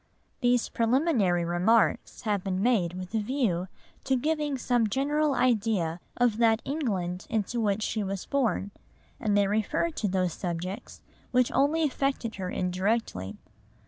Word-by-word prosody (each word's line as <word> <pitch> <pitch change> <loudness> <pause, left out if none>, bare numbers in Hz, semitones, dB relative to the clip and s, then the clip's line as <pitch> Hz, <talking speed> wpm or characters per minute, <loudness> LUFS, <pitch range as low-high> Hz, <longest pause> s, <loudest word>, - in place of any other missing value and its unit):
These 245 -2 +2
preliminary 230 - +2
remarks 185 +6 +2
have 205 -5 -1
been 190 0 -1
made 210 -9 +2
with 185 +2 -7
a 225 - +2
view 210 -6 0 0.4
to 265 - +2
giving 295 +1 0
some 245 -3 +1
general 290 +4 +1
idea 215 -9 +1 0.2
of 240 -3 +2
that 225 -1 +4
England 195 - -2
into 225 +1 -1
which 210 0 0
she 215 -1 -1
was 195 -1 -4
born, 240 -7 0 0.5
and 210 -3 +1
they 200 - +4
refer 220 +12 0
to 225 - -2
those 185 -3 0
subjects 180 +4 -5 0.3
which 250 -1 +2
only 290 +5 +2
affected 275 -5 -1
her 185 -2 -3
indirectly. 185 - -1
220 Hz, 145 wpm, -28 LUFS, 185-255 Hz, 0.5 s, that